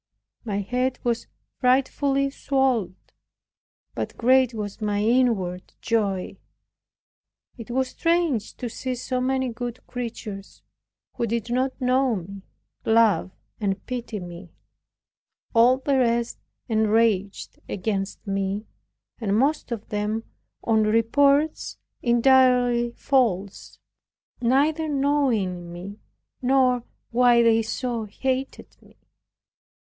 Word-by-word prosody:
My 205 -3 -2
head 250 +5 -1
was 235 -1 -1 0.3
frightfully 275 +2 +2
swelled, 265 -10 0 1.0
but - - -5
great 255 0 +4
was 210 0 -5
my 205 -1 0
inward 215 -7 +1
joy. 200 -4 -1 1.2
It 230 - -9
was 260 +1 0
strange 335 -10 0
to 245 - -4
see 255 +2 -4
so 255 +1 -2
many 260 0 0
good 240 +1 -6
creatures, 225 -5 -7 0.5
who 235 -2 -2
did 235 +1 -2
not 260 +2 0
know 255 -1 +2
me, 195 +1 -7 0.4
love 225 -4 +3 0.3
and 195 -3 -2
pity 240 -4 -4
me; 175 0 -9 1.0
all 240 +2 +5
the 270 0 +1
rest 235 -1 0 0.3
enraged 215 -3 +1
against 195 0 -3
me, 195 +1 -2 0.5
and 210 -3 0
most 275 +1 +1
of 225 -3 -4
them 210 +2 -2 0.4
on 220 -1 +3
reports 275 +8 +2 0.2
entirely 245 -1 +4
false, 210 -10 0 0.6
neither 295 +6 +2
knowing 250 -12 0
me, 185 +4 -8 0.4
nor 255 -2 +3 0.3
why 240 0 +5
they 225 -1 +4
so 230 0 -3
hated 260 +5 -3
me. - - -22
235 Hz, 105 wpm, -24 LUFS, 210-260 Hz, 1.2 s, all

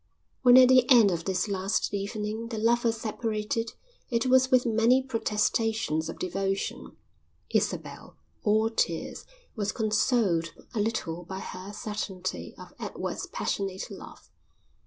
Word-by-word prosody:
When 250 -1 +8
at 255 -1 +8
the 255 -1 +5
end 230 -7 +7
of 165 -2 -3
this 190 +2 0
last 195 0 -1
evening 210 +3 -3
the 230 -1 -5
lovers 230 +1 +2
separated 225 0 -2 0.4
it 235 -2 0
was 260 0 +4
with 255 -1 +4
many 235 +3 +3
protestations 220 -7 0
of - - -6
devotion. 195 +2 -3 0.5
Isabel, - - -2 0.2
all 220 +1 +2
tears, - - -2 0.3
was 205 -3 -1
consoled 215 -6 +1 0.2
a 225 - -2
little 185 -6 -2
by 190 +2 -7
her 190 0 -7
certainty 205 -3 -5
of - - -12
Edward's - - -4
passionate 195 -1 -3
love. - - -12
215 Hz, 130 wpm, -28 LUFS, 195-230 Hz, 0.5 s, When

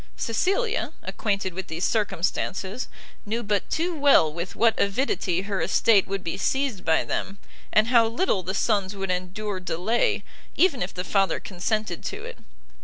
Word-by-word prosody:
Cecilia, 395 - 0
acquainted 200 -4 -2
with 190 +1 -5
these 165 +3 -2
circumstances, 195 +1 -1 0.4
knew 230 +3 -2
but 205 -1 -1
too 345 +3 0
well 280 - +5
with 170 +3 -5
what 230 -1 +4
avidity 195 -4 0
her 195 -2 -2
estate 195 +4 +4
would 195 -1 -3
be 165 - -3
seized 265 -8 0
by 160 -1 +3
them, 195 +1 -3 0.3
and 215 +2 +4
how 235 -2 +5
little 230 - 0
the 185 +2 -4
sons 200 -2 +1
would 195 -1 -2
endure 185 +2 -3
delay, 185 +6 0 0.3
even 340 -8 +3
if 180 - -1
the 180 - -4
father 195 +3 +1
consented 195 0 -2
to 425 +2 -5
it. 485 0 -9
200 Hz, 160 wpm, -25 LUFS, 185-235 Hz, 0.4 s, well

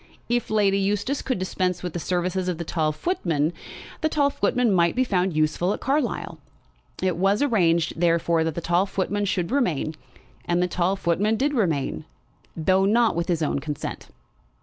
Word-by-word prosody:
If 240 0 0
Lady 200 -2 +2
Eustace 205 +7 0
could 260 - -2
dispense 185 -1 -2
with 180 -3 -4
the 175 - -3
services 180 +2 -1
of 180 -3 -1
the 170 - -4
tall 155 -1 0
footman, 165 - -1 0.5
the 315 - +2
tall 285 -2 +2
footman 245 -5 +1
might 170 -2 +3
be 255 - +3
found 185 -7 0
useful 155 +5 +1
at - - -5
Carlisle. 275 0 -1 0.6
It 185 -3 +1
was 195 +7 +2
arranged, 170 - +2
therefore, 170 -1 +2
that 160 -2 -2
the 170 - -3
tall 175 +4 +1
footman 205 +2 -1
should 185 0 -1
remain; 175 - 0 0.5
and 175 0 0
the 180 - +2
tall 180 +2 0
footman 195 +4 +1
did 285 +4 +1
remain, 160 - -1 0.5
though 185 +4 +3
not 225 +2 +3
with 170 0 -1
his 165 -3 0
own 145 - 0
consent. 150 +1 -5
185 Hz, 175 wpm, -24 LUFS, 170-210 Hz, 0.6 s, might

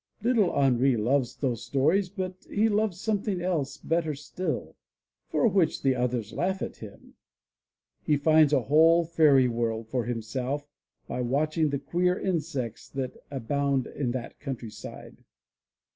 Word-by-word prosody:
Little 230 -6 +3
Henri 130 -2 +3
loves 125 +3 +1
those 125 -6 -2
stories, 160 +8 +2
but 185 -1 -6
he 220 +2 +2
loves 210 -4 0
something 205 -2 -1
else 155 -6 -1
better 160 0 -1
still, 150 +6 -4 0.5
for - - +2
which 190 -7 +1
the 135 -1 +4
others 125 -3 -2
laugh 190 +2 -1
at - - -6
him. 105 -3 -12 0.9
He 150 - +2
finds 155 0 +5
a 135 -4 +3
whole 165 +5 +5
fairy 150 -6 +4
world 115 -2 -2
for 125 -2 -1
himself 125 +5 -3 0.4
by 125 - -3
watching 150 +5 +1
the 140 - -1
queer 180 +6 0
insects 140 - -3
that 135 -2 -4
abound 140 0 0
in 135 -4 -3
that 130 -2 -6
countryside. 125 -6 -8
145 Hz, 140 wpm, -27 LUFS, 125-175 Hz, 0.9 s, finds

